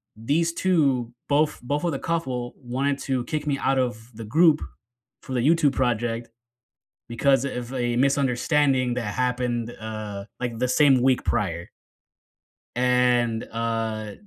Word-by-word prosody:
these 155 +9 0
2, 140 -11 +1 0.2
both 150 +1 +2
both 145 +6 -2
of 170 - +1
the 135 - -3
couple, 130 -8 -2
wanted 135 +2 -2
to 130 -2 0
kick 155 -1 -3
me 140 -1 +1
out 135 0 +1
of 120 -2 -3
the 115 - -7
group, 155 +5 +4 0.6
for 130 - -7
the 125 - +1
YouTube 150 0 +3
project, 120 -2 -1 0.8
because, 135 +3 +2
eh, 140 - -2
of 120 +1 -7
a 120 -1 -1
misunderstanding 135 -1 +2
that 110 -4 -3
happened, 125 -2 -1
uh, 105 -2 -6 0.2
like, 120 -2 -3
the 125 - +1
same 135 -1 +4
week 130 -1 +3
prior. 85 -4 -1 1.1
And, 125 -2 +2
uh, 115 -2 -2
125 Hz, 145 wpm, -24 LUFS, 115-140 Hz, 1.1 s, group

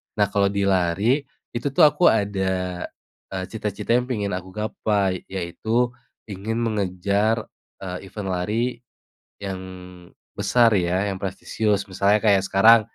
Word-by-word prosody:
Nah, 105 -1 +3
kalo 100 -1 +2
di 100 0 0
lari, 100 - +2 0.2
itu 120 +4 -3
tuh 165 - +3
aku 150 +3 +5
ada, 95 -3 0 0.5
eee, 95 -1 -3
cita-cita 105 -1 -4
yang 125 - 0
pengen 105 -6 -2
aku 95 +1 -10
gapai, 105 -3 -1
yaitu 110 +7 -1 0.4
ingin 110 +4 -3
mengejar, 100 +1 0 0.4
eee, 90 0 -6
event 95 0 -6
lari 110 +8 -1 0.7
yang 95 -2 -4 0.7
besar 110 +3 +3
ya, 90 +2 +1
yang 95 - -4
prestisius. 100 +1 -1
Misalnya 100 +3 +3
kayak 100 -2 +5
sekarang 110 +4 +7
100 Hz, 130 wpm, -23 LUFS, 95-110 Hz, 0.7 s, sekarang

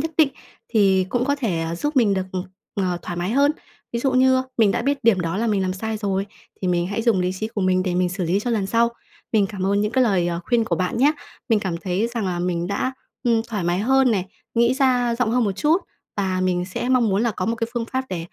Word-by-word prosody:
nhất 320 +2 -2
định 310 -3 +6 0.4
thì 195 -4 +3
cũng 245 +3 0
có 285 +1 +1
thể 185 -12 -1
giúp 295 +5 -2
mình 220 -6 +4
được, 190 -1 -2 0.5
ờ, 180 -3 -1
thoải 175 - -5
mái 175 +3 -2
hơn. 280 +4 +4 0.4
Ví 235 - -1
dụ 265 +1 +1
như 260 0 +4 0.2
mình 220 -3 +5
đã - - -1
biết 280 +2 +1
điểm 220 -5 +4
đó 170 +2 -2
là 230 - 0
mình 205 -3 +1
làm 185 0 0
sai 220 +3 -3
rồi 195 -2 -1 0.4
thì 185 - 0
mình 175 -1 +1
hãy 205 +4 -2
dùng 225 -5 +3
lý 180 0 0
trí 215 +4 -4
của 210 - -4
mình 185 0 +2
để 185 -1 -1
mình 180 0 +2
xử 180 0 -3
lý 180 +5 +1
cho 245 - -2
lần 210 -4 0
sau. 230 +3 +3 0.4
Mình 210 -3 +4
cảm 190 -1 -4
ơn 200 +1 +2
những 210 +2 -1
cái 260 -1 +4
lời, 190 -6 +2
ờ, 170 0 -2
khuyên 235 +1 +2
của - - -1
bạn 185 +5 -1
nhá! 290 +4 +5 0.4
Mình 225 - +4
cảm 185 -4 -2
thấy 185 +4 -1
rằng 225 -4 -1
là 180 -1 -2
mình 175 -1 -1
đã, 200 +7 -1 0.3
ừm, 230 -2 +2
thoải 210 -6 -3
mái 175 +1 +1
hơn 265 +4 +3
này, 190 -4 0 0.3
nghĩ 235 +2 +3
ra 250 -3 +2
rộng 235 -2 0
hơn 245 0 +2
một 200 - 0
chút, 300 - +2 0.3
và 190 -2 0
mình 180 -1 +1
sẽ 190 +6 -4
mong 255 -3 +3
muốn 200 +3 +1
là 235 - +2
có 185 -3 -3
một 230 - 0
cái 230 0 -1
phương 235 -1 -1
pháp 260 +2 -2
để, 185 - -3
210 Hz, 270 wpm, -22 LUFS, 185-240 Hz, 0.5 s, định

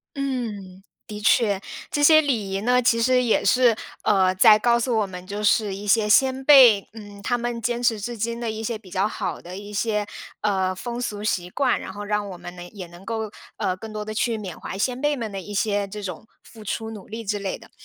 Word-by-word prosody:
嗯， 220 -9 -4 0.2
的 210 -2 -7
确。 210 -2 +3 0.3
这 290 - -1
些 310 +1 +8
礼 230 -10 -1
仪 195 +1 -2
呢， 250 +2 +3
其 230 -1 +3
实 250 +1 +3
也 230 - +2
是， 245 -3 +4 0.3
呃， 190 -3 +3
在 215 +2 +7
告 235 +1 +3
诉 240 0 0
我 205 - 0
们 180 -1 -9
就 205 +2 -5
是 210 -1 +2
一 205 +2 -7
些 215 +1 +3
先 265 +4 +3
辈， 250 -9 +7
嗯， 205 -2 -11
他 245 - +1
们 240 0 -3
坚 240 +1 -1
持 230 -3 +2
至 240 +4 -5
今 230 +2 -3
的 235 -2 -2
一 220 0 -6
些 225 0 -2
比 190 -4 -17
较 195 +2 +1
好 - - -4
的 180 +2 -9
一 205 +1 -9
些， 210 0 0 0.4
呃， 190 -3 0
风 240 +5 -5
俗 210 -3 -4
习 180 -4 -1
惯。 260 +4 +1
然 - - -7
后 205 +1 -7
让 210 -1 -1
我 180 - -8
们 175 +1 -9
呢， 175 - -10
也 190 -3 -7
能 175 +2 -14
够， 220 -1 -4 0.3
呃， 185 - -1
更 215 +4 -9
多 210 0 -5
地 215 - -5
去 225 +1 0
缅 190 -5 -7
怀 - - -6
先 250 +5 -1
辈 295 0 +2
们 225 -5 -5
的 195 -1 -5
一 205 - -10
些 205 -1 0
这 210 +1 -8
种 185 +3 -7 0.2
付 220 -2 -14
出 220 +2 -4
努 210 -3 -10
力 225 +2 -6
之 205 +1 -1
类 195 -1 -3
的。 - - -17
215 Hz, 255 characters per minute, -23 LUFS, 200-235 Hz, 0.4 s, 些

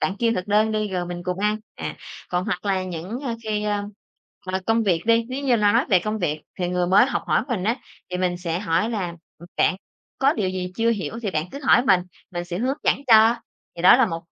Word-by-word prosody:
Bạn 190 - 0
kêu 230 0 +2
thực 180 - -3
đơn 215 +1 +2
đi 215 -1 -1
rồi 180 -2 -2
mình 175 0 -6
cùng 180 +1 -3
ăn." 210 +1 +1 0.2
À, - - -6 0.3
còn 180 0 -1
hoặc 185 -3 -3
là 190 -2 0
những, 185 +7 -5
ơ, 255 -5 -3
khi, 210 -1 -2
a, 205 -1 -1 0.6
mà 190 +1 -1
công 225 0 +3
việc 175 -6 +1
đi, 230 0 +4
nếu 260 +2 -4
như 250 -3 +3
no 205 -2 +3
nói 235 +3 +3
về 185 - +6
công 215 +4 -3
việc 155 -5 -2 0.2
thì 180 -1 -1
người 180 0 0
mới 195 +6 +5
học - - -2
hỏi - - +2
mình 210 -7 -2
á, 225 +4 +1 0.3
thì 180 - -2
mình 180 -1 0
sẽ 170 -1 -2
hỏi 200 +3 0
là 185 -7 -3 0.2
"Ừm, 170 - -12
bạn 185 - +3 0.4
có 275 +1 +4
điều 200 -8 -1
gì 185 -1 -4
chưa 230 0 +2
hiểu 225 +1 -3
thì 205 - -1
bạn 155 -3 -1
cứ 280 - -7
hỏi 250 -2 +5
mình, 190 -6 +5 0.3
mình 175 -1 -4
sẽ 175 0 -5
hướng 260 +5 0
dẫn - - +3
cho." 225 0 +6 0.4
Thì 170 - -6
đó 185 - +8
là 255 -2 +4
một 165 -4 -4
200 Hz, 255 wpm, -23 LUFS, 180-225 Hz, 0.6 s, đó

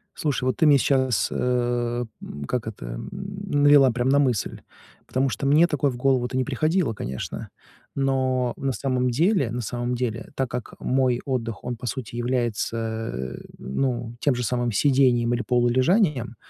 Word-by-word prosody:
Слушай, 145 -4 -1
вот 130 - 0
ты 160 - +4
мне 145 -1 +7
сейчас, 130 -3 +2
э, 120 -1 0 0.2
м, 70 - -7
как 120 - -2
это, 110 - -7
м, - - -6
навела 145 -8 +3
прямо 125 +2 0
на 140 - +4
мысль. 125 -7 0 0.5
Потому 130 +1 +1
что 120 +4 -4
мне 150 +5 +5
такое 145 -4 0
в 120 - -7
голову-то 130 -1 +1
не 130 - +2
приходило, 155 +1 +1
конечно. 65 - -5 0.5
Но 130 -2 +1
на 135 0 -1
самом 125 +1 0
деле, 155 - +2
на 120 +1 -3
самом 120 +2 -3
деле, 120 -2 -3
так 135 -2 -1
как 125 -1 -5
мой 130 -2 +1
отдых, 115 -5 -3
он, 125 0 -3
по 120 - -9
сути, 120 0 -5
является, 115 - -2 0.2
ну, 120 - -2
тем 145 - +2
же 125 0 -2
самым 120 +1 0
сидением 120 0 +3
или 120 - 0
полулежанием, 130 - +2
125 Hz, 165 wpm, -24 LUFS, 120-135 Hz, 0.5 s, мне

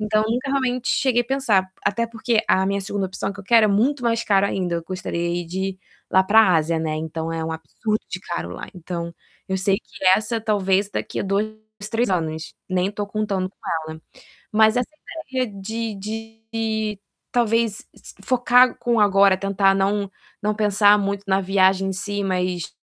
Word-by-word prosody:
Então 215 0 +1
nunca, 245 +5 -1
realmente, 255 -2 0
cheguei 250 -3 +2
a - - -17
pensar, 225 -8 +1
até 230 +3 +1
porque 230 0 0
a 190 0 +3
minha 200 +1 0
2ª 195 0 -2
opção 190 +1 -4
que 200 - -15
eu - - -14
quero 230 +1 +5
é - - +1
muito 245 +7 +2
mais 230 -1 +1
caro 200 -1 +3
ainda. 180 -3 -2
Eu 170 - -4
gostaria 175 -1 -3
de 175 +3 -7
ir 185 - -12 0.3
lá 190 0 +4
pra 205 -1 +5
Ásia, 160 +1 0
né, 155 -1 -2
então 160 +1 -4
é 165 -1 -3
um 160 - -3
absurdo 160 - -3
de 185 - -4
caro 170 - -5
lá. - - -7
Então 170 -1 -5 0.3
eu 190 - 0
sei 195 +1 +2
que - - -11
essa 225 +1 -2
talvez 200 -2 +1
daqui - - -3
a - - -1
2, 200 +2 0 0.4
3 230 -1 +1
anos, 160 -3 -2 0.2
nem 185 +1 0
tô 205 0 -4
contando 200 -3 -2
com - - -27 0.3
ela 160 0 -9 0.5
Mas 220 +1 +4
essa 250 - 0 0.4
ideia 260 -1 0
de 225 +1 -3
de 225 0 -4 0.3
talvez 230 -2 +1
si - - -13
focar 250 0 +4
com 240 -1 +1
o - - +3
agora, 195 -1 +5
tentar 195 0 +2
não 200 +1 0 0.3
não 210 0 0
pensar 205 -1 +4
muito 200 0 -2
na 190 0 +2
viagem 190 0 +3
em - - -2
si, 205 +2 -3
mas, 180 -2 -1
200 Hz, 190 wpm, -22 LUFS, 185-225 Hz, 0.5 s, quero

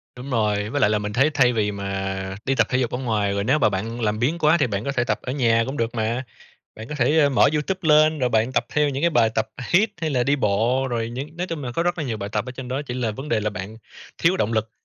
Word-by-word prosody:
Đúng 125 +2 -8
rồi. 105 -4 0
Với 145 +4 -1
lại 105 - +4
là 105 - +1
mình 105 0 -4
thấy 135 +7 +3
thay 125 -4 +4
vì 105 -2 0
mà 95 -1 -4
đi 135 - +1
tập - - +3
thể 130 - +1
dục 125 -2 0
ở - - -2
ngoài, 110 -6 0
rồi 100 0 -1
nếu 135 +8 +2
mà 110 - +4
bạn 110 +4 -4
làm 105 -1 0
biếng 145 +9 +1
quá 155 +2 +4
thì 145 - +2
bạn 100 -1 -3
có 140 - -2
thể 120 -3 0
tập 130 - -1
ở 125 - -4
nhà 115 -4 +2
cũng 135 +4 -5
được 115 +1 -2
mà, 115 +3 -1 0.5
bạn 110 +2 -9
có 150 - -5
thể, 145 +3 +2
ơ, 145 -2 +5
mở 135 - +4
YouTube 155 +5 -1
lên, 155 +1 +5
rồi 125 -3 +1
bạn 115 +2 +1
tập - - +1
theo 150 -1 +1
những 140 0 -3
cái 170 - +3
bài 115 -7 +3
tập 110 0 0 0.2
hít 205 +5 +4
hay 160 -2 -1
là 130 -3 +1
đi 140 +3 +2
bộ, 120 +3 +1
rồi 115 -2 -2
những 140 +7 -7
nói 180 +1 -2
chung 165 -5 -5
là 120 - -4
có 165 - 0
rất 175 0 -1
là 155 - -2
nhiều 120 -5 -3
bài 100 -1 -5
tập - - -1
ở 125 - -6
trên 130 -1 -8
đó, 130 +3 -2
chỉ 125 -4 -6
là 125 -3 -1
vấn 135 +8 -7
đề 115 -5 +1
là 105 0 -1
bạn 105 +2 -7 0.4
thiếu 180 +3 +3
động 110 - 0
lực. 110 -1 -1
125 Hz, 305 wpm, -23 LUFS, 110-145 Hz, 0.5 s, ơ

